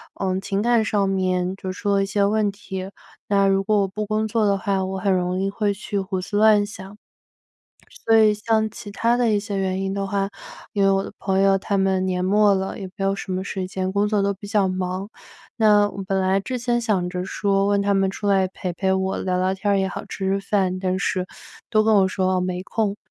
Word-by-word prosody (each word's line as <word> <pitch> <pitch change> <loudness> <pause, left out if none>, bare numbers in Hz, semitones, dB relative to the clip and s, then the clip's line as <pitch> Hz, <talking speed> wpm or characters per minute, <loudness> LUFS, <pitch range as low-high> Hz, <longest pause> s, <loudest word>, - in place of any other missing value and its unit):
呃， 190 -1 -1
情 195 0 -2
感 235 -1 +3
上 205 -3 +1
面 185 -1 0
就 190 -1 -5
出 205 +2 -2
了 195 - +2
一 - - 0
些 200 0 +1
问 210 0 +1
题。 190 -2 -7 0.4
那 200 -1 +3
如 195 0 +2
果 210 0 +2
我 195 - +1
不 210 +3 -4
工 215 +1 -1
作 220 0 +1
的 200 -1 +3
话， 195 0 -1
我 190 0 -4
很 200 -1 +1
容 180 0 0
易 195 - 0
会 205 0 0
去 200 0 -4
胡 190 -1 -3
思 200 +2 -3
乱 215 -1 +5
想。 195 -1 -10 1.1
所 225 - +5
以 215 -1 +6
像 220 +1 0
其 205 - -10
他 235 +3 +1
的 245 -2 +2
一 205 - +2
些 200 -1 -4
原 190 0 -1
因 195 0 -2
的 195 0 -2
话， 195 0 -1 0.4
因 200 -1 +1
为 195 - +5
我 195 0 +2
的 - - -7
朋 190 0 0
友 195 0 +4
他 200 +1 -2
们 190 -1 +1
年 180 0 -1
末 205 +1 +4
了， 190 0 -3
也 195 - -5
没 195 - -3
有 195 0 +2
什 190 - -5
么 185 +1 -2
时 190 -2 -4
间， 185 0 -3
工 205 +1 +2
作 210 -1 +1
都 200 0 +1
比 195 +2 -11
较 200 -1 +2
忙。 185 +1 -3 0.5
那 210 -2 +4
我 195 - -6
本 195 -1 0
来 190 +1 +2
之 255 +6 -4
前 240 0 0
想 200 -6 0
着 180 0 -3
说 195 +1 0
问 200 0 +2
他 200 0 +1
们 195 0 +2
出 205 +2 -6
来 190 -2 +3
陪 185 -1 -5
陪 190 +2 0
我 190 0 -1
聊 185 -1 -1
聊 185 +1 +1
天 200 +1 0
儿 - - +3
也 190 0 0
好、 - - -6
吃 190 - -4
吃 195 +1 +1
饭， 195 -2 0
但 185 0 -1
是 185 -2 -1 0.4
都 215 -2 +4
跟 220 - +3
我 195 -1 +5
说 185 -1 0
没 180 0 -2
空。 205 +1 -1
195 Hz, 260 characters per minute, -22 LUFS, 190-205 Hz, 1.1 s, 以